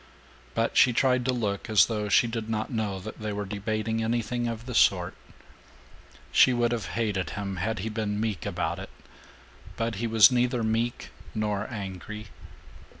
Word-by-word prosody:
But 115 0 0
she 125 - +6
tried 125 0 +2
to 130 - +2
look 105 -4 -2
as 110 -2 +6
though 105 -2 -2
she 120 - +5
did 115 -1 -4
not 110 -1 -2
know 105 -5 -2
that 105 +4 -8
they 110 0 -2
were 100 0 -3
debating 110 +3 -2
anything 120 +1 -1
of 115 0 -5
the 125 - -6
sort. 90 -5 +3 1.2
She 130 - +6
would 120 -1 +1
have 120 -3 -2
hated 105 -5 0
him 100 -2 -3
had 110 +5 -1
he 105 +4 -3
been 105 -1 -2
meek 105 -7 -2
about - - -2
it. - - -7 0.9
But 115 -2 -2
he 115 - 0
was 115 +2 +7
neither 125 -1 +1
meek 115 +2 -1 0.3
nor 105 -1 -1
angry. 105 0 -7
110 Hz, 170 wpm, -27 LUFS, 105-115 Hz, 1.2 s, was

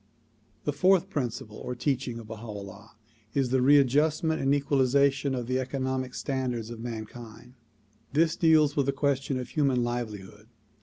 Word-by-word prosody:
The 145 - -1
fourth 185 +4 +3
principle 115 -6 -4
or 125 - -5
teaching 125 -1 -1
of 115 - -8
Baha 110 +1 -8
'Ullah 100 0 -9 0.4
is 135 -3 +1
the 130 -1 +3
read 140 +1 +6
justment 155 +4 +1
and 135 - +2
equalization 140 -1 +2
of 125 -2 -3
the 130 +2 0
economic 130 -1 -3
standards 125 -4 -3
of 115 - -8
mankind. 115 +1 -8 0.6
This 160 +2 +2
deals 155 -3 +4
with 140 -2 +1
the 140 - +1
question 135 -1 0
of 125 - -6
human 135 -5 +1
livelihood. 105 -4 -5
130 Hz, 155 wpm, -28 LUFS, 120-140 Hz, 0.6 s, read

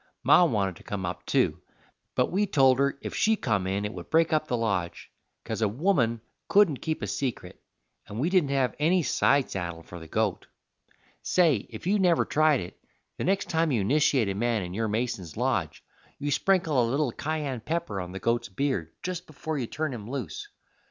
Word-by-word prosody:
Ma - - +6
wanted 100 - +1
to - - -15
come 100 -3 -4
up, 90 - -5
too, - - +1 0.5
but - - +1
we 205 +3 +1
told 135 -5 +4
her 140 0 +1
if - - -5
she 220 +1 +3
come 105 - -1
in 100 +2 -1
it 105 - -4
would 90 -2 -9
break 165 0 +3
up 155 0 +1
the 125 - 0
lodge, 100 -7 -2 0.3
'cause - - -4
a 110 - +3
woman 120 - +1 0.3
couldn't 195 -9 +4
keep 160 -6 -3
a - - +1
secret, 100 -3 -4 0.5
and 105 - -6
we 145 - +1
didn't 180 -6 +2
have 135 -2 +1
any 170 +4 +3
side 140 -1 +2
saddle 85 -3 -4
for 85 +1 -10
the 80 - -11
goat. 110 +2 -1 0.7
Say, 160 - +2
if 110 +4 -9
you 205 +3 +2
never 175 -3 +3
tried 155 -4 +3
it, 90 - -9 0.4
the - - -1
next 195 +2 +1
time 165 -1 +1
you 115 -6 +1
nishiate 135 0 +3
a 100 - -1
man 115 0 0
in 90 0 -6
your 110 +3 -1
Mason's 105 -7 -3
lodge - - -1 0.3
you 145 +1 -3
sprinkle 165 -3 +2
a 115 - +1
little 140 0 +1
kyan 145 -2 -3
pepper 155 - -3
on 90 0 -7
the 95 - -6
goat's 115 +3 0
beard 95 - -2
just 180 -1 -4
before 155 0 -4
you 120 - -2
turn 155 +1 -3
him 110 -2 -7
loose. 125 - -5
130 Hz, 200 wpm, -27 LUFS, 100-155 Hz, 0.7 s, Ma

